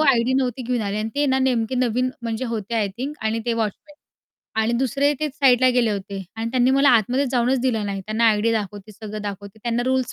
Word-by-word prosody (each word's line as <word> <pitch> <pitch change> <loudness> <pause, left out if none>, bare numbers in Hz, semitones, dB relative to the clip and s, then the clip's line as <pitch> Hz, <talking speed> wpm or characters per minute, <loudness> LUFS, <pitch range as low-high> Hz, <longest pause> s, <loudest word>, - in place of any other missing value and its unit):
ID 260 -4 +3
नव्हती 255 -1 0
घेऊन 245 0 -1
आले 200 +1 -2
आणि 220 +1 -2
ते 290 0 +1
ना 265 0 +2
नेमके 255 -2 +1
नवीन 250 0 +1
म्हणजे 230 +2 -3
होते 230 -2 -4
आय 210 -3 +1
थिंक 285 +4 -4
आणि 220 +1 0
ते 235 - +2
वॉचमन 230 - -4 0.7
आणि 225 +2 +1
दुसरे 270 +4 +1
ते 305 - 0
साईडला 255 -2 +4
गेले 240 -3 +2
होते 195 -1 -4
आणि 225 +1 -3
त्यांनी 255 +1 +3
मला 275 +1 +4
आतमध्येच 250 +4 +2
जाऊनच 250 +1 +2
दिलं 230 -5 0
नाही, 195 -1 -3
त्यांना 220 +2 0
आयडी 220 +2 +2
दाखवते, 205 -1 -4
सगळं 215 0 -7
दाखवते, 200 +1 -7
त्यांना 235 0 0
रुल्स 260 -1 0
235 Hz, 215 wpm, -22 LUFS, 215-260 Hz, 0.7 s, साईडला